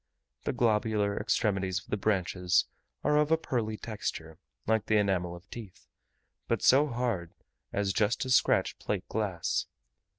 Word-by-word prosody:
The -, -, +1 dB
globular 110 Hz, -4 st, +1 dB
extremities 95 Hz, -4 st, 0 dB
of 95 Hz, -, -5 dB
the -, -, +2 dB
branches 95 Hz, -3 st, +1 dB, 0.4 s
are 150 Hz, 0 st, +3 dB
of 150 Hz, 0 st, +3 dB
a 160 Hz, -, +4 dB
pearly 115 Hz, -8 st, -2 dB
texture, 80 Hz, -8 st, -5 dB, 0.3 s
like 110 Hz, -1 st, +1 dB
the 110 Hz, -, +4 dB
enamel 90 Hz, -4 st, +1 dB
of 90 Hz, +2 st, -14 dB
teeth, 110 Hz, -6 st, -10 dB, 0.6 s
but -, -, 0 dB
so 140 Hz, +4 st, +6 dB
hard 115 Hz, -, -2 dB, 0.4 s
as 100 Hz, -1 st, 0 dB
just 105 Hz, +3 st, +1 dB
to 130 Hz, -, -1 dB
scratch 125 Hz, -, +3 dB
plate 100 Hz, -3 st, -3 dB
glass. 100 Hz, -6 st, -1 dB
105 Hz, 145 wpm, -30 LUFS, 95-115 Hz, 0.6 s, so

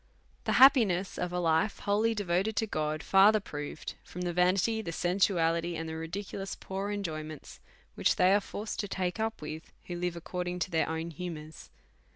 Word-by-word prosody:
The -, -, +1 dB
Happiness 220 Hz, -9 st, +5 dB
of 180 Hz, -, -2 dB
a 180 Hz, -, -2 dB
Life 170 Hz, +4 st, +1 dB
wholly 215 Hz, +3 st, +2 dB
devoted 195 Hz, +1 st, 0 dB
unto 220 Hz, -, +1 dB
God, 155 Hz, -5 st, -2 dB
further 205 Hz, +3 st, +6 dB
proved 150 Hz, -5 st, -6 dB
from 180 Hz, -, -8 dB
the 175 Hz, -1 st, -1 dB
"canity, 185 Hz, +5 st, +2 dB
the 165 Hz, -, -4 dB
sensuality, 170 Hz, -1 st, +1 dB
and 165 Hz, 0 st, -4 dB
the 160 Hz, -, -5 dB
ridiculous 195 Hz, +4 st, -5 dB
poor 195 Hz, +1 st, -4 dB
Enjoyments, 155 Hz, -7 st, -5 dB, 0.4 s
lohich -, -, +2 dB
they 185 Hz, +1 st, +5 dB
are 205 Hz, -, +4 dB
forced 210 Hz, +2 st, -6 dB
to 205 Hz, -, -1 dB
take 185 Hz, +1 st, -2 dB
up 220 Hz, -6 st, -2 dB
with, 155 Hz, +1 st, -7 dB
who 175 Hz, -, -5 dB
live 175 Hz, 0 st, -2 dB
according 180 Hz, +1 st, -4 dB
to 180 Hz, +1 st, -2 dB
their 160 Hz, -1 st, +1 dB
own 160 Hz, +1 st, -3 dB
Humours. 160 Hz, -2 st, -7 dB
180 Hz, 180 wpm, -30 LUFS, 165-200 Hz, 0.4 s, further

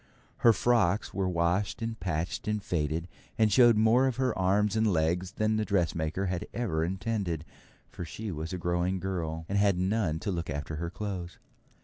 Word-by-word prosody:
Her 115 Hz, -, +6 dB
frocks 110 Hz, -4 st, +2 dB
were 95 Hz, -1 st, 0 dB
washed 90 Hz, +3 st, 0 dB
and 115 Hz, -1 st, -4 dB
patched 85 Hz, 0 st, -3 dB
and 105 Hz, 0 st, 0 dB
faded, 80 Hz, -1 st, -1 dB, 0.3 s
and 110 Hz, -3 st, +3 dB
showed 120 Hz, -2 st, +6 dB
more 115 Hz, +5 st, +4 dB
of 130 Hz, -, -1 dB
her 130 Hz, -2 st, 0 dB
arms 100 Hz, +3 st, +2 dB
and 110 Hz, -1 st, +3 dB
legs 90 Hz, +3 st, 0 dB
than 110 Hz, 0 st, +1 dB
the 110 Hz, -, +1 dB
dressmaker 90 Hz, -3 st, 0 dB
had 90 Hz, -2 st, -2 dB
ever 95 Hz, -10 st, 0 dB
intended, 95 Hz, -3 st, -2 dB, 0.5 s
for -, -, -6 dB
she 105 Hz, +5 st, -6 dB
was 80 Hz, 0 st, -5 dB
a 90 Hz, -, -3 dB
growing 90 Hz, +2 st, 0 dB
girl, 85 Hz, -4 st, -3 dB
and 100 Hz, +1 st, 0 dB
had 100 Hz, -3 st, +3 dB
none 95 Hz, -3 st, 0 dB
to 105 Hz, -, -2 dB
look 85 Hz, -2 st, -3 dB
after 75 Hz, +2 st, -4 dB
her 85 Hz, +2 st, -3 dB
clothes. 90 Hz, -2 st, -5 dB
95 Hz, 185 wpm, -29 LUFS, 85-105 Hz, 0.5 s, Her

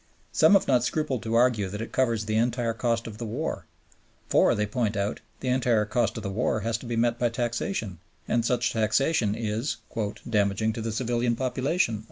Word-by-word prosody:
Some -, -, +5 dB
have 195 Hz, -, +4 dB
not 125 Hz, -3 st, +3 dB
scrupled 135 Hz, -3 st, -1 dB
to 115 Hz, 0 st, -2 dB
argue 115 Hz, -5 st, +3 dB
that 105 Hz, +2 st, -5 dB
it 115 Hz, -, -5 dB
covers 115 Hz, -4 st, +1 dB
the 110 Hz, 0 st, -1 dB
entire 120 Hz, 0 st, +1 dB
cost 115 Hz, -1 st, -1 dB
of 110 Hz, -2 st, -8 dB
the 120 Hz, -, -4 dB
war; 120 Hz, -, -3 dB, 0.6 s
for, -, -, +4 dB
they 105 Hz, -, 0 dB
point 110 Hz, -1 st, -1 dB
out, 100 Hz, +2 st, -1 dB, 0.2 s
the 130 Hz, -, -2 dB
entire 120 Hz, -4 st, +2 dB
cost 115 Hz, -1 st, 0 dB
of 110 Hz, -, -5 dB
the 100 Hz, -, -3 dB
war 110 Hz, +1 st, 0 dB
has 115 Hz, +2 st, -1 dB
to 120 Hz, -, -9 dB
be 120 Hz, -, -2 dB
met 120 Hz, +1 st, +1 dB
by 120 Hz, -, +2 dB
taxation, 115 Hz, -, -3 dB, 0.3 s
and 120 Hz, 0 st, +1 dB
such 120 Hz, +1 st, +1 dB
taxation 110 Hz, 0 st, +2 dB
is 115 Hz, +4 st, -2 dB, 0.5 s
"damaging 105 Hz, 0 st, +1 dB
to 115 Hz, -, -5 dB
the 115 Hz, 0 st, -2 dB
civilian 120 Hz, +1 st, 0 dB
population." 130 Hz, -, 0 dB
115 Hz, 200 wpm, -26 LUFS, 110-125 Hz, 0.6 s, Some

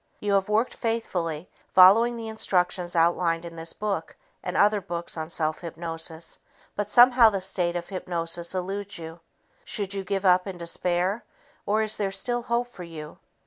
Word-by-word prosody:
You 205 Hz, -1 st, -1 dB
have 195 Hz, 0 st, +2 dB
worked 220 Hz, +4 st, +1 dB
faithfully 180 Hz, -9 st, -2 dB, 0.3 s
following 225 Hz, +6 st, +7 dB
the 225 Hz, -1 st, -6 dB
instructions 180 Hz, -4 st, 0 dB
outlined 170 Hz, 0 st, +2 dB
in 170 Hz, -1 st, -8 dB
this 165 Hz, 0 st, -5 dB
book 210 Hz, -2 st, -3 dB, 0.3 s
and -, -, -3 dB
other 205 Hz, 0 st, +4 dB
books 170 Hz, -2 st, -5 dB
on 160 Hz, -1 st, -5 dB
self 155 Hz, -2 st, -1 dB
hypnosis, 165 Hz, -1 st, -4 dB, 0.4 s
but 205 Hz, 0 st, -2 dB
somehow 245 Hz, 0 st, +7 dB
the 200 Hz, -2 st, -2 dB
state 180 Hz, -2 st, 0 dB
of 175 Hz, 0 st, -4 dB
hypnosis 170 Hz, -2 st, -3 dB
eludes 195 Hz, +2 st, -3 dB
you. 165 Hz, 0 st, -9 dB, 0.4 s
Should 200 Hz, -2 st, -3 dB
you 195 Hz, -1 st, -3 dB
give 195 Hz, 0 st, -2 dB
up 180 Hz, +1 st, +4 dB
in 190 Hz, -2 st, -6 dB
despair, 180 Hz, +4 st, -1 dB, 0.4 s
or 215 Hz, +2 st, +2 dB
is 215 Hz, 0 st, -1 dB
there 200 Hz, -2 st, 0 dB
still 240 Hz, +6 st, -1 dB
hope 240 Hz, 0 st, -1 dB
for 215 Hz, -, -12 dB
you? 160 Hz, -3 st, -9 dB
185 Hz, 170 wpm, -26 LUFS, 170-210 Hz, 0.4 s, following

